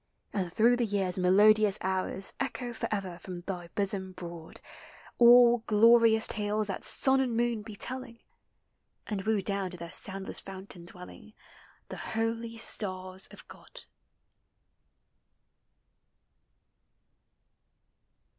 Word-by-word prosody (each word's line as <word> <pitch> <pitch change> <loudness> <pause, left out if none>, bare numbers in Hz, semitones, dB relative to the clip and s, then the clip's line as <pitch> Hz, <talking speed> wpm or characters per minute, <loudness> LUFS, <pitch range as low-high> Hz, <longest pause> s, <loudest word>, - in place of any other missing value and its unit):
And 185 -4 -2
through 235 +5 +3
the 245 - 0
year's 195 -3 -1
melodious 205 +3 +5
hours 190 +1 -2
Echo 250 -2 -3
forever 195 -6 -4
from 180 -2 -8
thy 175 -1 -6
bosom 190 -2 0
broad 170 -2 -9 0.6
All 240 0 +7
glorious 225 +1 +5
tales 210 0 0
that 195 -2 -5
sun 265 0 +2
and 245 -4 0
moon 235 -2 0
be 210 0 -10
telling: 255 +1 -5 0.9
And 205 -3 -3
woo 215 0 0
down 195 -1 -2
to 180 - -9
their 170 0 -8
soundless 195 0 -4
fountain 190 -2 -9
dwell 180 +1 -11
i - - -13
no 215 - -17 0.6
The - - -7
holy 225 +1 -3
stars 185 -4 -5
of - - -15
God - - -13
205 Hz, 115 wpm, -29 LUFS, 185-230 Hz, 0.9 s, All